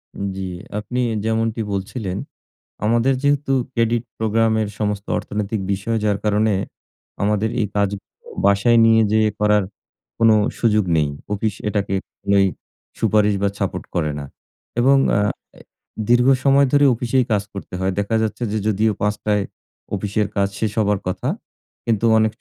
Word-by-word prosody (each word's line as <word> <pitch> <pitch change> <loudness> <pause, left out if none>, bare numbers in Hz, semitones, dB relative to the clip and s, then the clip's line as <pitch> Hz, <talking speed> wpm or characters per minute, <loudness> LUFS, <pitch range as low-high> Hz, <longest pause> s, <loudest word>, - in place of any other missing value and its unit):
উম 100 - -4
জি, 95 -1 -3 0.3
আপনি 125 +4 -4 0.3
যেমনটি 115 0 0
বলছিলেন, 95 0 -3 0.7
আমাদের 120 +4 +3
যেহেতু 140 -1 +2 0.2
ক্রেডিট 115 0 +1
প্রোগ্রামের 110 0 +1
সমস্ত 105 -1 -1
অর্থনৈতিক 105 0 -3
বিষয় 105 +4 -1
যার 100 -1 +2
কারণে, 105 0 +2 0.7
আমাদের 105 +1 +1
এই 105 - 0
কাজগুলো 100 -1 -3 0.2
বাসায় 100 +4 +4
নিয়ে 115 0 +5
যেয়ে 110 0 +3
করার 105 -1 +3 0.5
কোন 115 0 +5 0.3
সুযোগ 105 -3 +3
নেই। 75 -2 +2 0.3
অফিস 105 0 -1
এটাকে 100 -2 -1 0.3
কোনই 100 -1 +3 0.5
সুপারিশ 105 -1 +3
বা 100 - +2
সাপোট - - -2
করে 75 -3 0
না। 70 - -6 0.5
এবং 135 +3 +5 0.2
আ - - +3 0.3
অ্যা - - -16 0.5
দীর্ঘ 120 +1 +5 0.2
সময় 140 0 +5
ধরে 145 0 +5
অফিসেই 125 +2 +1
কাজ 105 -2 +2
করতে 100 -2 -8
হয়। 95 +1 0
দেখা 100 +2 0
যাচ্ছে 110 +2 -3
যে 110 - 0
যদিও 110 +1 +2
৫ঃ০০ 105 0 -1
য় - - -1 0.5
অফিসের 105 +1 -1
কাজ 100 0 +2
শেষ 110 -2 0
হবার 105 -2 +2
কথা। 90 - -3 0.6
কিন্তু 115 -1 +1
অনেক 110 0 +3
105 Hz, 145 wpm, -21 LUFS, 100-115 Hz, 0.7 s, নিয়ে